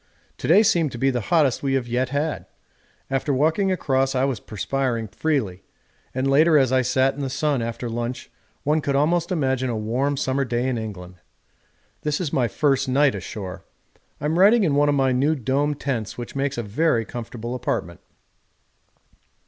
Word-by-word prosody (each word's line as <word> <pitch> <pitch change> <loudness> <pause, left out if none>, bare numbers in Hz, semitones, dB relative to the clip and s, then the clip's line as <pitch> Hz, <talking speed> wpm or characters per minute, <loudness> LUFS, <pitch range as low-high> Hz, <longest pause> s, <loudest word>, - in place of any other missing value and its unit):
To - - -4
day 195 +7 +6
seemed 165 -8 +2
to - - -5
be 135 +3 +2
the 125 -2 -1
hottest 150 -7 +3
we 135 -1 0
have 130 -2 0
yet 125 +2 0
had; 145 +3 -2 0.6
after 135 +2 0
walking 160 +8 +2
across 135 -6 0
I 130 - +2
was 135 -6 -2
perspiring 115 +1 -2
freely, 110 - -1 0.5
and 130 +1 -1
later 155 +3 +5
as 130 -3 +3
I 130 0 +4
sat 130 +2 +2
in 145 - -10
the 135 - -2
sun 145 -1 0
after 115 +1 -4
lunch 120 +2 -4 0.3
one 155 +2 +1
could 140 -1 -1
almost 165 +5 +1
imagine 130 -6 0
a 115 - -2
warm 125 +7 -1
summer 135 +1 0
day 125 0 -1
in 130 - 0
England. 90 -5 -8 0.8
This 150 -1 -1
is 170 -6 -3
my 125 -3 +2
first 135 +4 +1
night 140 +1 +3
ashore. 95 -4 -7 0.6
I'm 155 +4 0
writing 210 +4 +6
in 160 -6 +2
one 145 +1 +3
of 145 - +2
my 135 -1 +2
new 140 +5 +2
domed 140 +3 -1
tents 120 -7 -3
which 120 +1 -7
makes 135 -1 -1
a 120 - -2
very 115 +2 +1
comfortable 120 0 -6
apartment. 115 -8 -3
135 Hz, 180 wpm, -23 LUFS, 120-145 Hz, 0.8 s, day